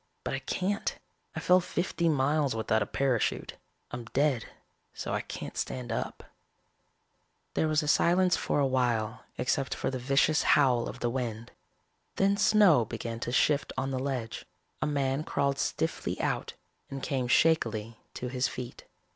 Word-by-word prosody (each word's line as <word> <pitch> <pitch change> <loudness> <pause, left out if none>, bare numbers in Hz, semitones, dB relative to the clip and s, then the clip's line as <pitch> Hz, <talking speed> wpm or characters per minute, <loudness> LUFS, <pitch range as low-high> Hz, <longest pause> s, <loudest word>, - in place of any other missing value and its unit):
But - - -3
I - - -1
can't. 200 +3 -2 0.4
I - - -2
fell 180 0 +5
fifty 170 -1 -1
miles 145 -2 +2
without 110 0 +1
a 100 - 0
parachute. 130 -4 0 0.3
I'm 120 - -5
dead 135 0 +1 0.5
so - - -4
I - - 0
can't - - -7
stand 125 -2 -3
up." - - -3 1.3
There 160 - +1
was 155 0 +1
silence 180 +1 +4
for - - 0
a 140 - +3
while 120 -3 0
except 130 +1 0
for - - -2
the 130 - -3
vicious 140 +4 +3 0.2
howl 125 -5 +3
of - - -9
the 120 - +1
wind. 115 -2 -4 0.6
Then 195 +1 +3
snow 200 - +5
began 115 +1 -5
to 120 - -3
shift 140 +2 +2
on 135 +1 -1
the 130 - -1
ledge. 130 -4 -3 0.4
A 145 - +1
man 140 0 0
crawled 140 -3 0
stiffly - - -2
out - - -1 0.4
and 135 -1 -6
came 130 -4 -1
shakily 115 -7 +2 0.2
to 125 - -4
his 125 0 0
feet. 125 -1 -7
135 Hz, 155 wpm, -29 LUFS, 120-150 Hz, 1.3 s, fell